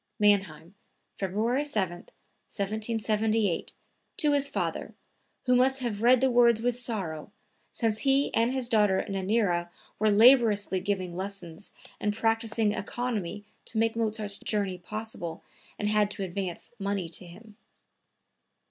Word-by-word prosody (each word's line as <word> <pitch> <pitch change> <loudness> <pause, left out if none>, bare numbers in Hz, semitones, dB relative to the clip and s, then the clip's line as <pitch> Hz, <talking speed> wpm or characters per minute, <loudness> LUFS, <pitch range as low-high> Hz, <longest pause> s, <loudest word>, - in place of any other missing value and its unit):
(Mannheim, 190 -5 +1 0.4
February 220 +8 -1
7, 205 -12 -1
1778, 215 +1 -2 0.4
to 300 -2 +2
his 280 -1 +4
father, - - -3 0.5
who 250 -1 +4
must 260 +2 +4
have 220 -4 -3
read 245 +1 +5
the 265 -1 +3
words 235 -2 +5
with 240 +1 0
sorrow, 200 -11 -3 0.4
since 220 -2 0
he 275 +3 +2
and 230 +2 +2
his 260 -2 -1
daughter 210 -5 +2
Nannerl 195 -3 0 0.3
were 215 +1 +3
laboriously 215 -3 +5
giving 185 -2 -3
lessons 190 -1 -7 0.3
and 210 0 -1
practicing 225 -1 +1
economy 210 -3 -4 0.2
to 225 - -6
make 225 0 +1
Mozart's 215 -3 -1
journey 200 -4 -1
possible 180 -4 -5 0.3
and 210 - -2
had 210 -1 +2
to 200 - -5
advance 185 -1 -5
money 200 -3 -2
to 175 +2 -7
him.) 210 +5 -14
210 Hz, 130 wpm, -28 LUFS, 195-230 Hz, 0.5 s, read